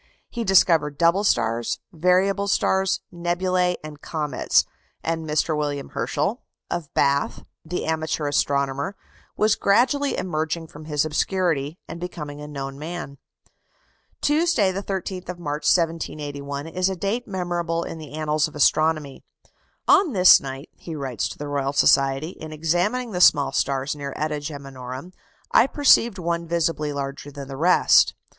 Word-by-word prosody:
He 235 Hz, -, -3 dB
discovered 165 Hz, -7 st, +3 dB
double 170 Hz, +5 st, +3 dB
stars, 115 Hz, -, +1 dB, 0.2 s
variable 185 Hz, +4 st, +2 dB
stars, 190 Hz, -1 st, +1 dB
nebulæ, 180 Hz, +1 st, 0 dB
and 150 Hz, -1 st, -9 dB
comets; 150 Hz, -3 st, +1 dB, 0.4 s
and 165 Hz, -1 st, -2 dB
Mr. 155 Hz, +1 st, +1 dB
William 145 Hz, -2 st, -3 dB
Herschel, -, -, -2 dB, 0.3 s
of 160 Hz, -4 st, -4 dB
Bath, 140 Hz, 0 st, +1 dB, 0.2 s
the 180 Hz, +3 st, -4 dB
amateur 160 Hz, -1 st, -1 dB
astronomer, 140 Hz, +4 st, 0 dB, 0.4 s
was 215 Hz, 0 st, +3 dB
gradually 255 Hz, +7 st, +2 dB
emerging 160 Hz, -1 st, -2 dB
from 150 Hz, +1 st, -11 dB
his 150 Hz, -1 st, 0 dB
obscurity, 155 Hz, -2 st, 0 dB
and 165 Hz, -, -7 dB
becoming 150 Hz, -5 st, -6 dB
a 150 Hz, -, -7 dB
known 135 Hz, -1 st, -6 dB
man. 155 Hz, -3 st, -6 dB, 1.0 s
Tuesday, 295 Hz, -, +2 dB
the 190 Hz, +1 st, -3 dB
13th 190 Hz, -2 st, -5 dB
of 180 Hz, -, -4 dB
March, 150 Hz, -3 st, -4 dB
1781, 145 Hz, -4 st, -1 dB
is 180 Hz, +3 st, 0 dB
a 190 Hz, -, -3 dB
date 205 Hz, +7 st, -2 dB
memorable 175 Hz, -3 st, -2 dB
in 165 Hz, -, -7 dB
the 150 Hz, -2 st, -10 dB
annals 155 Hz, -1 st, +1 dB
of 155 Hz, -, -14 dB
astronomy. 155 Hz, -1 st, +1 dB, 0.6 s
"On 385 Hz, -7 st, +5 dB
this 185 Hz, -2 st, +7 dB
night," 135 Hz, +1 st, -7 dB
he 165 Hz, -, -7 dB
writes 135 Hz, -6 st, -3 dB
to -, -, -9 dB
the 145 Hz, -, -6 dB
Royal 140 Hz, -1 st, -1 dB
Society, 135 Hz, +2 st, +3 dB
"in 155 Hz, -3 st, -9 dB
examining 175 Hz, +11 st, 0 dB
the 180 Hz, -2 st, -2 dB
small 140 Hz, -5 st, +5 dB
stars 135 Hz, +1 st, -1 dB
near 140 Hz, -2 st, -6 dB
[eta] 150 Hz, 0 st, -2 dB
Geminorum, 135 Hz, +1 st, -8 dB, 0.4 s
I 240 Hz, -, +5 dB
perceived 240 Hz, -7 st, +4 dB
one 170 Hz, -1 st, -2 dB
visibly 165 Hz, -3 st, 0 dB
larger 140 Hz, 0 st, -5 dB
than 140 Hz, -1 st, -8 dB
the 135 Hz, -, -7 dB
rest. 170 Hz, +6 st, +4 dB
160 Hz, 145 wpm, -23 LUFS, 145-180 Hz, 1.0 s, this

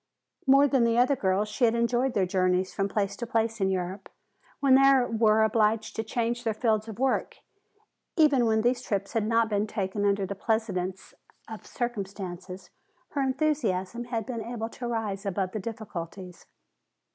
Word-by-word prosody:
More 275 Hz, +2 st, +6 dB
than 265 Hz, -3 st, +2 dB
the 230 Hz, 0 st, +2 dB
other 255 Hz, +3 st, +4 dB
girls 195 Hz, -2 st, 0 dB
she 210 Hz, +4 st, -3 dB
had 230 Hz, 0 st, +2 dB
enjoyed 240 Hz, +2 st, +1 dB
their 195 Hz, -, +3 dB
journeys 185 Hz, 0 st, +1 dB
from 195 Hz, 0 st, -1 dB
place 200 Hz, -1 st, -1 dB
to 235 Hz, -, -5 dB
place 225 Hz, -1 st, -1 dB
in 190 Hz, -, +2 dB
Europe, 190 Hz, +1 st, -3 dB, 0.5 s
when 275 Hz, -2 st, +4 dB
they 275 Hz, +1 st, +7 dB, 0.2 s
were 220 Hz, -1 st, +4 dB
obliged 220 Hz, 0 st, +1 dB
to 220 Hz, -, -2 dB
change 235 Hz, +2 st, -2 dB
their 225 Hz, -3 st, -1 dB
fields 220 Hz, -2 st, 0 dB
of 220 Hz, -2 st, -8 dB
work. 265 Hz, +1 st, 0 dB, 0.8 s
Even 285 Hz, -7 st, +4 dB
when 220 Hz, 0 st, +2 dB
these 245 Hz, +1 st, +1 dB
trips 200 Hz, -4 st, -3 dB
had 220 Hz, -2 st, 0 dB
not 230 Hz, 0 st, +3 dB
been 210 Hz, 0 st, 0 dB
taken 200 Hz, 0 st, -2 dB
under 200 Hz, -1 st, +2 dB
the 200 Hz, -, -4 dB
pleasantest 195 Hz, -3 st, -2 dB, 0.6 s
conditions 190 Hz, -5 st, -5 dB, 0.4 s
her 285 Hz, -, -2 dB
enthusiasm 240 Hz, -7 st, -1 dB
had 230 Hz, -3 st, -3 dB
been 240 Hz, -3 st, -4 dB
able 230 Hz, 0 st, -4 dB
to 240 Hz, +1 st, -6 dB
rise 215 Hz, -4 st, -3 dB
above 195 Hz, -2 st, -2 dB
the 215 Hz, -, -4 dB
difficulties. 190 Hz, -5 st, -7 dB
220 Hz, 170 wpm, -27 LUFS, 195-240 Hz, 0.8 s, they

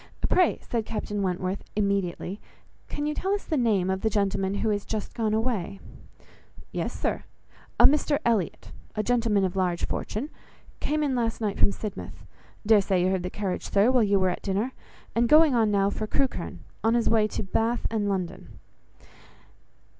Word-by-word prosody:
"Pray," 360 Hz, -2 st, +3 dB
said 230 Hz, -2 st, -1 dB
Captain 210 Hz, -1 st, -3 dB
Wentworth, 185 Hz, +1 st, -2 dB
immediately, 200 Hz, -1 st, -1 dB, 0.5 s
"can 290 Hz, -, -3 dB
you 300 Hz, -, 0 dB
tell 385 Hz, +5 st, 0 dB
us 405 Hz, -, -5 dB
the 320 Hz, -, -2 dB
name 210 Hz, -8 st, +2 dB
of 190 Hz, 0 st, -2 dB
the 220 Hz, -, +2 dB
gentleman 195 Hz, -1 st, 0 dB
who 220 Hz, +1 st, 0 dB
is 205 Hz, -1 st, -1 dB
just 215 Hz, -2 st, -4 dB
gone 220 Hz, -2 st, 0 dB
away?" 220 Hz, -5 st, -1 dB, 0.9 s
"Yes, -, -, -2 dB
Sir, -, -, -1 dB, 0.5 s
a -, -, +7 dB
Mr 295 Hz, 0 st, +4 dB
Elliot, 220 Hz, -7 st, 0 dB, 0.2 s
a 215 Hz, -, 0 dB
gentleman 225 Hz, -4 st, +2 dB
of 185 Hz, 0 st, -3 dB
large 180 Hz, -2 st, 0 dB
fortune, 260 Hz, +9 st, -4 dB, 0.5 s
came 305 Hz, +1 st, 0 dB
in 280 Hz, -3 st, +1 dB
last 230 Hz, -2 st, -1 dB
night 210 Hz, -3 st, -2 dB
from -, -, +5 dB
Sidmouth. 210 Hz, 0 st, -7 dB, 0.4 s
Dare 215 Hz, -1 st, +6 dB
say 190 Hz, -2 st, +1 dB
you 185 Hz, -, +2 dB
heard 190 Hz, -1 st, 0 dB
the 180 Hz, -, -3 dB
carriage, 195 Hz, -1 st, -3 dB
sir, 205 Hz, +5 st, +4 dB
while 255 Hz, -2 st, +4 dB
you 200 Hz, -2 st, +3 dB
were 185 Hz, -1 st, +3 dB
at 180 Hz, -, -3 dB
dinner; 205 Hz, +6 st, -1 dB, 0.4 s
and 235 Hz, 0 st, +2 dB
going 310 Hz, -2 st, +7 dB
on 225 Hz, -3 st, +3 dB
now 200 Hz, -1 st, +2 dB
for 215 Hz, -, -3 dB
Crewkherne, 270 Hz, +3 st, -2 dB, 0.2 s
in 225 Hz, +1 st, +3 dB
his 235 Hz, -2 st, +1 dB
way 220 Hz, -2 st, +4 dB
to 215 Hz, -, -4 dB
Bath 225 Hz, +5 st, 0 dB
and 210 Hz, -2 st, 0 dB
London." 185 Hz, -2 st, -4 dB
210 Hz, 180 wpm, -26 LUFS, 195-235 Hz, 0.9 s, a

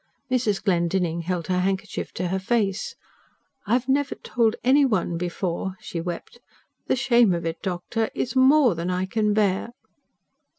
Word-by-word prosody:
Mrs. 230 Hz, -6 st, +1 dB
Glendinning 170 Hz, -2 st, +1 dB
held 175 Hz, -1 st, -2 dB
her 180 Hz, -1 st, 0 dB
handkerchief 190 Hz, +1 st, -2 dB
to 180 Hz, 0 st, -2 dB
her 190 Hz, +1 st, -1 dB
face. 200 Hz, -1 st, -1 dB, 0.7 s
"I 215 Hz, -, +1 dB
have 250 Hz, +1 st, +1 dB
never 280 Hz, +1 st, +1 dB
told 230 Hz, -3 st, 0 dB
any 270 Hz, +4 st, +5 dB
one 205 Hz, -9 st, +1 dB
before," 180 Hz, +2 st, -3 dB
she 165 Hz, -, -5 dB
wept. 175 Hz, +7 st, -6 dB, 0.5 s
"The -, -, +2 dB
shame 240 Hz, -6 st, +4 dB
of 170 Hz, -, -4 dB
it, 165 Hz, 0 st, -3 dB
doctor... 190 Hz, +5 st, -2 dB
is 255 Hz, -, -2 dB
more 260 Hz, -2 st, +5 dB
than 170 Hz, +2 st, -3 dB
I 185 Hz, +1 st, 0 dB
can 210 Hz, +1 st, 0 dB
bear." 210 Hz, +2 st, +1 dB
195 Hz, 160 wpm, -24 LUFS, 180-235 Hz, 0.7 s, any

